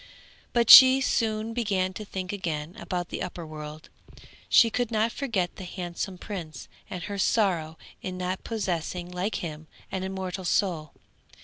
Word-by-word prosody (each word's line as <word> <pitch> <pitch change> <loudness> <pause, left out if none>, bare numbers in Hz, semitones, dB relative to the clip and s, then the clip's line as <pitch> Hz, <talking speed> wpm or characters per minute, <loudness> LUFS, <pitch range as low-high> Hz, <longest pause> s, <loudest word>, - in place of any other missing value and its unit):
But 235 -2 +4
she 260 0 +11
soon 225 -3 0
began 195 -5 0
to 215 - -6
think 190 -2 -5
again 165 -3 -4
about 180 -4 -4
the - - -5
upper 175 -1 -5
world, 155 0 -9 0.6
she 230 -2 +6
could 245 0 -1
not 225 0 +1
forget 225 -10 -2
the - - -7
handsome 180 +1 -5
prince 180 -5 -7 0.2
and 180 -1 -6
her 200 +1 -5
sorrow 175 -7 +1 0.2
in 185 -1 -5
not 185 +1 -3
possessing, 180 -4 -3
like 180 +4 -2
him, 155 -1 -7 0.2
an 190 -1 -3
immortal 190 0 -4
soul. 170 -5 0
185 Hz, 150 wpm, -27 LUFS, 175-215 Hz, 0.6 s, she